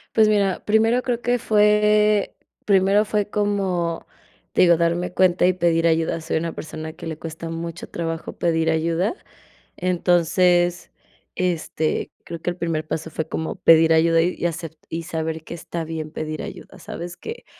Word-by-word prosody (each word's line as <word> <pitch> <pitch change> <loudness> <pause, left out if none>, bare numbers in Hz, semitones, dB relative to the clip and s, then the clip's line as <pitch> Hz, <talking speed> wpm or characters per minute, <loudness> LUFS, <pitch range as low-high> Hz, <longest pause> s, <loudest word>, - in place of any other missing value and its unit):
Pues 220 -1 +5
mira, 200 -3 +1
primero 225 +3 +3
creo 245 -2 -1
que 245 +1 +1
fue, 210 -1 +3 0.3
primero 195 +1 +4
fue 210 -1 -1
como, 190 -5 -1 0.5
te - - +3
digo, 170 -1 +6
darme 170 +1 0
cuenta 180 -1 +3
y 185 - +4
pedir 170 -2 +1
ayuda, 165 0 +1
soy 160 0 -1
una 165 0 -3
persona 155 0 -7
que - - -10
le 160 -1 -5
cuesta 165 0 -7
mucho 165 +1 -6
trabajo 165 -1 -4
pedir 165 -1 +1
ayuda, 165 - 0 0.6
entonces, 175 0 +2 0.4
este, 165 -3 -1
creo 170 -1 -7
que 175 - -1
el 175 - -5
primer 165 -3 -2
paso 160 0 -4
fue 160 0 -4
como 160 - -3
pedir 165 0 +6
ayuda 165 0 +4
y 175 0 -1
hacer, 165 -1 -4
y 165 +1 -4
saber 160 -2 -4
que - - -7
está 170 0 -5
bien 160 -1 -5
pedir 155 -1 -5
ayuda, 190 - -10
¿sabes?, 175 +1 -7
que 455 - -8
170 Hz, 165 wpm, -22 LUFS, 165-195 Hz, 0.6 s, digo